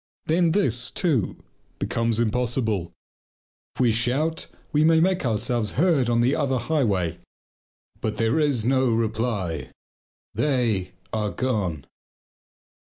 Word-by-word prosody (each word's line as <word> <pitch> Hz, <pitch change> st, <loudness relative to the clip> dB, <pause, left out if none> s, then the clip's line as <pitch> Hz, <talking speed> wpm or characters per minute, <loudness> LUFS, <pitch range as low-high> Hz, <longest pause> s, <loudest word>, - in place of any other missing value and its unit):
Then 165 Hz, 0 st, +2 dB
this, 125 Hz, -, 0 dB
too, 150 Hz, -, -1 dB, 0.3 s
becomes 115 Hz, -1 st, 0 dB
impossible. 115 Hz, -5 st, 0 dB, 0.8 s
If -, -, -2 dB
we 120 Hz, -2 st, +4 dB
shout 130 Hz, +8 st, 0 dB, 0.2 s
we 150 Hz, +1 st, +3 dB
may 160 Hz, 0 st, +5 dB
make 185 Hz, +1 st, +2 dB
ourselves 115 Hz, 0 st, 0 dB
heard 150 Hz, -6 st, +3 dB
on 120 Hz, 0 st, +3 dB
the 130 Hz, +5 st, +3 dB
other 140 Hz, -4 st, 0 dB
highway, 105 Hz, -, 0 dB, 0.8 s
but 110 Hz, -, -3 dB
there 115 Hz, +7 st, +1 dB
is 140 Hz, -7 st, +1 dB
no 130 Hz, 0 st, +3 dB
reply. 110 Hz, -, -1 dB, 0.6 s
They 120 Hz, -10 st, 0 dB, 0.2 s
are 105 Hz, -1 st, 0 dB
gone! 100 Hz, -, -2 dB
120 Hz, 115 wpm, -24 LUFS, 110-145 Hz, 0.8 s, may